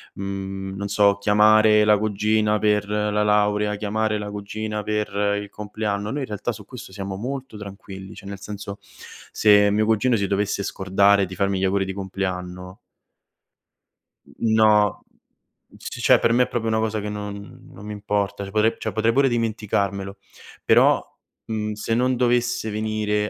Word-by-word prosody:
mhmm, 95 0 -5
non 100 +1 -4
so 100 0 +3
chiamare 105 +1 +5
la 105 -1 +5
cugina 105 0 +1
per 105 -1 +1
la 105 0 0
laurea, 105 0 +2
chiamare 105 +1 -1
la 105 0 -5
cugina 105 +1 -4
per 105 -1 -1
il 100 - -9
compleanno, 105 0 -4
noi 145 +1 -3
in - - -2
realtà 105 +3 -3
su 105 -2 -10
questo 125 -6 -10
siamo 95 -1 -5
molto 130 +1 -6
tranquilli, 100 -1 -9
cioè 100 - -11
nel 100 -1 -7
senso: 105 -1 -7
se 105 -1 +1
mio 105 +1 +2
cugino 115 +3 +2
si 100 - 0
dovesse 100 0 -1
scordare 100 +1 +2
di 95 - -8
farmi 100 0 0
gli - - -2
auguri 95 0 +1
di 95 - -4
compleanno 90 -1 -5 1.5
N 110 -1 -2
no, 105 -2 +3 0.7
c - - -8
cioè - - +5
per 115 - +2
me 125 +1 +4
è - - -3
proprio 115 -2 -2
una 110 - +1
cosa 110 -1 -1
che 105 - -4
non 105 +3 -7
non 105 - -12
mi 105 - -6
importa, 100 -1 -2
cioè 100 - -9
potre 110 +2 +2
cioè - - -4
potrei 110 +1 +2
pure 135 +1 +4
dimenticarmelo, 100 -4 -2 0.5
però, - - +4 0.4
mhmm, 105 -1 -3
se 105 +2 -3
non 125 +1 +2
dovesse 120 -2 +1
venire 105 -1 -1
105 Hz, 165 wpm, -23 LUFS, 100-110 Hz, 1.5 s, chiamare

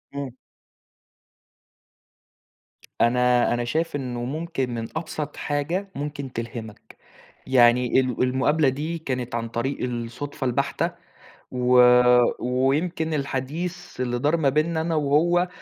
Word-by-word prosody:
إمم. 140 -2 -4 2.7
أنا 125 0 +3
أنا 120 0 -1
شايف 160 +7 -1
إنه 125 -3 -4
ممكن 150 -1 -3
من 115 -1 -4
أبسط 155 -2 -4
حاجة، 160 +7 -2
ممكن 140 -2 -5
تلهمك. 115 -2 -7 0.5
يعني 125 -1 +4
ال 130 -1 0
المقابلة 135 +3 +2
دي 155 +6 -3
كانت 125 -6 -4
عن 115 0 -2
طريق 120 +4 -2
الصدفة 125 +3 -4
البَحتة. 140 +7 0 0.6
و 125 0 +4 0.6
ويمكن 150 +7 0
الحديث 150 +4 -4
اللي 120 -1 -1
دار 150 +6 +2
ما 145 -4 +2
بينا 155 +3 +1
أنا 165 0 -1
وهو، 160 +5 +2
135 Hz, 110 wpm, -24 LUFS, 125-155 Hz, 2.7 s, يعني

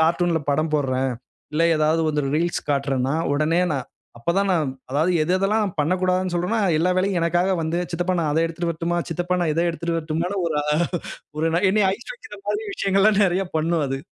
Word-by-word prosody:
கார்ட்டூன்ல 170 0 +2
படம் 155 +2 0
போடுறேன், 130 -2 0 0.4
இல்லை 165 +2 +2
ஏதாவது 155 +2 +2
வந்து 150 -1 0
ரீல்ஸ் 170 +2 0
காட்டுறேன்னா, 135 -1 0 0.2
உடனே 160 +4 +2
நான் 135 -3 -3 0.3
அப்ப 120 - -1
தான் 200 0 +1
நான் 155 -7 +1 0.2
அதாவது 155 +6 +1
எது 170 +4 0
எதெல்லாம் 200 +1 +1
பண்ணக்கூடாதுன்னு 185 +3 +1
சொல்றோனோ, 180 +6 0 0.2
எல்லா 180 +3 +2
வேலையும் 185 -1 +1
எனக்காக 175 +3 +1
வந்து, 160 +2 -1
சித்தப்பா 175 +2 -1
நான் 155 - 0
அதை 160 +2 +2
எடுத்துட்டு 170 +1 -3
வரட்டுமா, 170 +1 -1
சித்தப்பா 175 +2 -1
நான் 160 - +1
இதை 170 - +1
எடுத்துட்டு 170 0 -3
வரட்டுமான்னு 165 +5 -2
ஒரு 155 -2 -1
அ - - -6 0.7
ஒரு 160 - +1
நை - - +2
என்னை 210 0 +3
ஐஸ் 235 - -11
வைக்கிற - - -12
மாதிரி 420 0 -2
விஷயங்கள்லாம் 195 - +3
நிறைய 190 +1 +1
பண்ணும் 160 -1 +1
அது. 135 0 -2
170 Hz, 185 wpm, -23 LUFS, 155-185 Hz, 0.7 s, என்னை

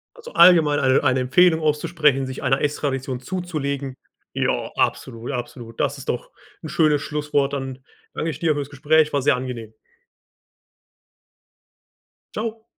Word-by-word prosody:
Also, 480 0 -12
allgemein 165 -5 +6
eine 130 -1 +3
eine 130 0 +2
Empfehlung 160 +6 +4
auszusprechen, 150 -2 +1
sich 130 +1 -7
einer 135 +1 +1
Ess-Tradition 135 -3 -2
zuzulegen. 140 -6 -4 0.4
Ja, - - -1
absolut 115 +4 -2
absolut, 120 -2 -7
das 140 +1 0
ist 135 - -8
doch 125 - -3 0.3
'n 155 - -6
schönes 150 -3 +2
Schlusswort. 145 -2 -1
Dann 135 -1 -4 0.3
danke 165 - -2
ich - - -6
dir 160 -2 +2
für 145 - -3
das 140 0 -5
Gespräch, 150 +2 +2
war 140 - +1
sehr 140 -1 +3
angenehm. 120 -4 -6 2.6
Tschau. 225 0 -4
145 Hz, 140 wpm, -22 LUFS, 130-155 Hz, 2.6 s, allgemein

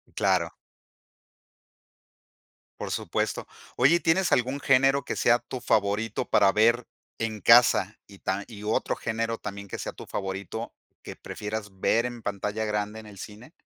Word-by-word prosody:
Claro. 90 -4 +1 2.3
Por - - -4
supuesto. - - -2 0.3
Oye, 130 +7 +5
¿y - - +2
tienes 175 +3 +2
algún 130 +3 +1
género 135 0 +3
que - - -4
sea 120 +1 +4
tu 125 +2 -7
favorito 105 -1 0
para 100 -1 +5
ver 115 +3 +3 0.3
en 110 -2 -2
casa 110 -3 +5
y 100 -1 -15
tam 95 +2 -2
y 105 -3 -10
otro 110 - 0
género 115 0 -2
también 100 -1 -7
que - - -6
sea - - -5
tu - - -10
favorito, 95 -1 -5 0.3
que - - -8
prefieras 105 -2 -6
ver 115 +4 +2
en 120 -1 -5
pantalla 105 +2 -3
grande, 105 +1 -2
en 110 - -12
el 100 -2 -12
cine? 110 - -10
110 Hz, 155 wpm, -27 LUFS, 100-120 Hz, 2.3 s, Oye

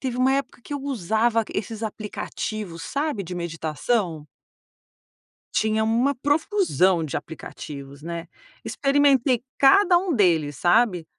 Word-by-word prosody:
teve 255 -2 -3
uma 260 +1 +3
época 275 -2 -2
que - - -9
eu 285 - -4
usava 230 -2 0
esses 220 +2 -4
aplicativos, 210 -3 -5
sabe, 285 -7 -2
de 180 - -6
meditação? 165 +1 -2 1.3
Tinha 220 0 +1
uma 240 +5 +1
profusão 290 - +2
de 145 - -3
aplicativos, 140 -3 -8
né. 170 +1 -5 0.4
Experimentei 275 -3 +2 0.2
cada 350 +7 +6
um 355 -1 +1
deles, 165 - +2
sabe. 180 -1 +3
220 Hz, 120 wpm, -24 LUFS, 170-270 Hz, 1.3 s, cada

